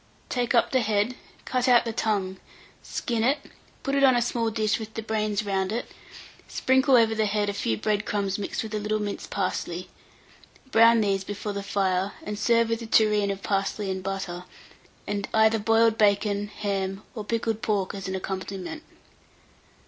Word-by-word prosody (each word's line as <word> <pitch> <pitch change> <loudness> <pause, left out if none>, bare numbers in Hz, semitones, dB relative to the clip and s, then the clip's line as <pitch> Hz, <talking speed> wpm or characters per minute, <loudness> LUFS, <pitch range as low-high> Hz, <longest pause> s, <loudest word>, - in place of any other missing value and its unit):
Take 245 -1 0
up 235 - +3
the 260 - +3
head, 215 +2 +1 0.3
cut 255 0 0
out 245 -1 +6
the 230 - -3
tongue, 195 -4 -1 0.4
skin 230 -2 -2
it, 270 +5 +3 0.5
put 275 - -2
it 275 0 +3
on 260 -2 +6
a - - +4
small 230 -1 0
dish 215 -1 0
with 220 0 -8
the 225 - -4
brains 215 -1 -1
round 195 -1 0
it; 235 +2 -4 0.6
sprinkle 260 +1 +3
over 225 -2 +5
the 220 -1 +1
head 205 0 0
a - - -2
few 115 - -1
bread 210 -1 0
crumbs 200 -2 -1
mixed 200 - -3
with 220 -1 -7
a 215 - 0
little 210 +1 -1
minced 205 -1 -4
parsley; 185 -2 -3 0.8
brown 230 0 +6
these 195 -2 +1
before 205 +1 -5
the 200 - -3
fire, 195 -1 0
and 210 0 -5
serve 230 +1 +3
with 230 0 -1
a 230 - -6
tureen 210 -2 +3
of 195 0 -4
parsley 195 0 -1
and 190 0 -3
butter, 185 -2 -4 0.6
and 205 -1 -3
either 220 0 +4
boiled 225 +1 +3
bacon, 205 0 +2
ham, 195 -1 -3
or 220 -4 -5
pickled 225 0 -1
pork 205 -5 0
as 195 -1 -6
an 190 - -3
accompaniment. 190 - -5
210 Hz, 180 wpm, -26 LUFS, 195-225 Hz, 0.8 s, out